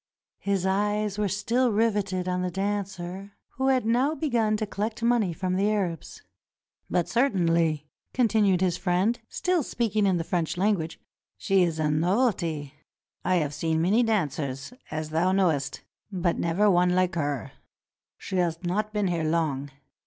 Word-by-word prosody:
His 195 -2 -1
eyes 205 +1 0
were 210 - +1
still 235 +6 +1
riveted 205 -4 0
on 180 0 0
the 180 - -1
dancer 195 0 -4 0.2
who 265 +1 -2
had 260 -3 +2
now 255 +7 +2
begun 235 -9 +1
to 215 - -2
collect 215 +3 -4
money 235 -6 +2
from 185 +2 -2
the 200 +2 +2
Arabs. 185 -7 -3 0.7
"But 175 - +1
certainly," 170 - +1 0.2
continued 215 -7 +2
his 180 -2 +1
friend, 190 +6 +1
still 360 -2 0
speaking 220 -5 0
in 185 -2 +2
the 165 - -1
French 170 0 -1
language, 185 -4 0 0.4
"she 195 -1 +2
is 170 -3 +1
a 155 -1 +1
novelty. 165 - 0 0.5
I 185 - +2
have 150 -4 0
seen 160 +2 0
many 195 +8 +3
dancers, 150 - -1 0.2
as 155 0 -4
thou 175 +4 +2
knowest, 160 -8 +1 0.3
but 175 -3 0
never 175 +5 +2
one 180 -2 +4
hke 185 0 +2
her. 145 - -2 0.7
She 190 - -4
has 170 -2 +1
not 210 +5 -1
been 210 -1 0
here 170 -3 0
long. 155 -4 0
185 Hz, 155 wpm, -26 LUFS, 165-210 Hz, 0.7 s, one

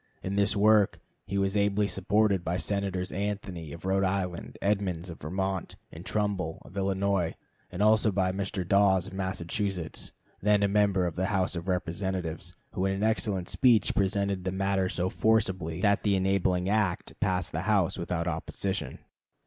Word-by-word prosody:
In 95 +1 -2
this 100 -1 +2
work 105 0 +4 0.3
he 100 - -2
was 95 +1 +1
ably 100 0 +2
supported 100 0 +2
by 85 +1 -1
Senators 95 -2 -2
Anthony, 95 -5 -4
of 85 +3 -9
Rhode 95 +1 +2
Island, 95 -2 -2
Edmunds, 95 -4 -1
of 80 - -11
Vermont, 95 +4 -3 0.2
and 80 - -9
Trumbull, 100 -6 -1
of - - -14
Illinois, 95 -2 0 0.4
and 90 +3 -1
also 110 0 +4
by 95 -1 +1
Mr. 95 -1 -3
Dawes, 95 -2 +4
of - - -8
Massachusetts, 95 -1 -3 0.3
then 105 0 +3
a - - +4
member 100 -2 +2
of 85 - -2
the 95 +1 0
House 95 -3 +1
of 85 +1 -5
Representatives, 90 -1 -2 0.2
who 95 +1 0
in 95 - 0
an 100 - -2
excellent 105 -4 +1
speech 120 -4 +3
presented 100 -1 0
the 95 - -1
matter 95 0 0
so 90 0 -1
forcibly 95 -6 +1
that 100 0 +3
the 100 -2 +2
enabling 95 -1 +1
act 105 -3 0
passed 90 -2 0
the 80 - -2
House 95 -4 +3
without 85 0 -2
opposition. 90 +4 -3
95 Hz, 165 wpm, -28 LUFS, 90-100 Hz, 0.4 s, work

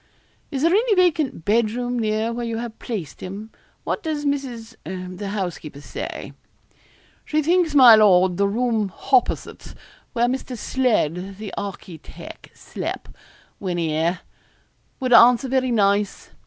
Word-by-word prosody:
'Is 275 0 -3
there 335 - +4
any 435 +1 +3
vacant 320 - +1
bed 220 +1 +2
room 245 +2 -3
near 220 +1 -1
where 240 +1 -4
you 230 -1 -3
have 230 -1 -6
placed 200 - -6
him? 205 +4 -7 0.3
What - - -2
does 310 -4 -3
Mrs. 255 -5 -3
the 185 +3 -6
housekeeper, 175 -7 -5
say?' 145 - -7 0.9
'She 310 0 0
thinks, 335 -1 +2
my 255 -4 +9
lord, 190 -4 +5
the 200 0 +2
room 225 -1 0
hopposit, 255 +7 -1 0.4
where 240 -1 +2
Mr. 255 0 -3
Sledd, 195 - -1
the 210 -2 -7
architeck, 190 -4 -9
slep, - - -6 0.5
when 180 -3 -3
'ere, 165 +2 0 0.8
would 255 -2 0
answer 245 +3 +7
very 260 0 +1
nice. 205 -3 0
225 Hz, 135 wpm, -22 LUFS, 195-260 Hz, 0.9 s, my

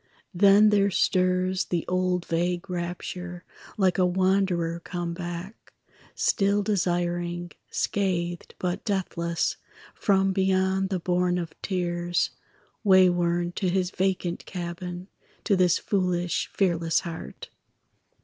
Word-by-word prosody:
Then 200 +3 +6
there 200 -1 +3
stirs 185 0 +1
the 175 -2 -2
old 180 -1 0
vague 175 +2 -1
rapture, 175 0 -5 0.3
Like 190 -2 +2
a 185 - +5
wanderer 185 -2 +1
come 175 0 -4
back, 175 +3 -7 0.4
Still 200 +1 +2
desiring, 175 -3 -1 0.2
scathed 175 -3 -2
but 180 +2 -2
deathless, 170 -5 -1 0.4
From 195 -1 +2
beyond 190 0 +1
the 190 -2 -1
bourne 180 +1 +1
of 170 -2 -4
tears, 175 -2 -1 0.5
Wayworn 175 -3 +4
to 185 - +1
his 185 0 0
vacant 185 -2 -1
cabin, 175 0 -6 0.4
To 205 - +2
this 180 -2 +4
foolish 180 -3 -1
fearless 170 -4 +1
heart. 170 -3 -8
180 Hz, 110 wpm, -26 LUFS, 175-190 Hz, 0.5 s, Then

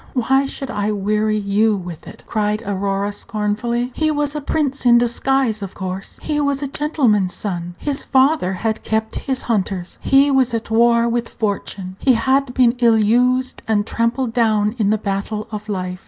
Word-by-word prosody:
why 265 +2 +2
should 270 -2 -6
I 205 0 -1
weary 215 +1 0
you 210 +1 +2
with 175 -4 -8
it?" - - -12
cried 210 0 -1
Aurora, 200 +1 -1
scornfully. 220 +4 -2
"He 310 -1 0
was 295 -1 -1
a 300 - -2
prince 280 -1 -1
in 240 -1 +6
disguise, 240 -1 +1
of 195 -2 -7
course; 190 0 -5
he 300 -1 -1
was 280 0 0
a - - -1
gentleman's 255 - +1
son; 175 -4 -4
his 285 -2 -3
father 265 - +2
had 220 +4 -2
kept 220 0 -1
his 265 -1 -1
hunters; 195 -5 -2
he 275 +1 +4
was 260 -3 +2
at 225 0 -5
war 235 +1 +4
with 235 0 -1
fortune; 195 -3 -4
he 260 - +4
had 260 +3 +1
been 250 -2 +5
ill 230 -2 +5
used 250 +4 +2
and 210 -2 +1
trampled 230 +2 -1
down 215 -3 +2
in 205 -2 +2
the 215 - +2
battle 210 +1 -3
of 210 0 -6
life. 185 -2 -3
225 Hz, 180 wpm, -19 LUFS, 205-260 Hz, -, in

